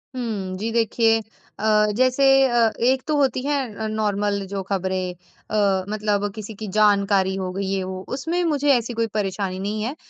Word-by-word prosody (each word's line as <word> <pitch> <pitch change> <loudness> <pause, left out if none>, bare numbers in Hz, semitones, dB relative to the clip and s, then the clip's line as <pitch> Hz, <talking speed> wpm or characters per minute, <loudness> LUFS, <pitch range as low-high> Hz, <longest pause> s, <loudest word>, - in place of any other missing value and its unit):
हुँ, 205 -7 -3
जी 225 +3 -3
देखिए 225 0 +2 0.4
अ, 210 0 +3
जैसे 255 +2 +3 0.2
अ, 235 -3 +3
एक 255 +2 +2
तो 305 - +1
होती 265 -2 +1
है 245 -7 -2
नॉर्मल 205 -1 0
जो 195 0 -4
खबरें 185 -1 -2
अ, 190 +2 -2
मतलब 205 -1 0
किसी 215 0 -7
की 215 +1 -7
जानकारी 200 -2 +3
हो 185 -1 -3
गई 195 +1 -3
ये-वो 190 -1 -3
उसमें 330 +7 -1
मुझे 290 -3 +1
ऐसी 240 -1 0
कोई 230 - +2
परेशानी 195 -2 -2
नहीं 210 +2 -3
है 255 +7 -3
210 Hz, 165 wpm, -22 LUFS, 195-235 Hz, 0.4 s, अ